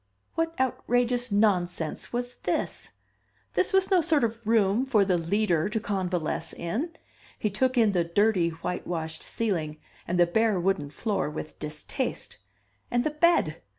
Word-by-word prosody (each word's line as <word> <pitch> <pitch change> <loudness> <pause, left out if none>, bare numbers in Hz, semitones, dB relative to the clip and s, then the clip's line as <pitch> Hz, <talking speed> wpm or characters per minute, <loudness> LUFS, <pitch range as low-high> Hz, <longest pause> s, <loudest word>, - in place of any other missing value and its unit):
What 330 -1 -2
outrageous 245 -1 +1
nonsense 180 -6 +1
was 245 +1 -2
this? - - -2 0.6
This - - +2
was 385 0 +2
no 370 -2 +5
sort 310 -4 +2
of 230 0 0
a 230 -2 -8
room 220 +1 +3
for 225 -7 +3
the 185 -2 +2
Leader 175 0 +1
to 220 - -1
convalesce 180 -6 -2
in. 240 - -3 0.4
He 210 - -1
took 255 +5 +1
in 225 -3 +5
the 180 -3 +2
dirty 180 0 +2
white 170 +2 -5
washed 160 -2 -4
ceiling, 165 -9 -2 0.3
and 180 +1 0
the 175 - +7
bare 215 +2 +2
wooden 175 -5 0
floor 195 +1 -1
with 150 0 -7
distaste. 150 0 -4 0.5
And 240 0 +1
the 310 - 0
bed! 300 - +2
205 Hz, 155 wpm, -27 LUFS, 170-245 Hz, 0.6 s, the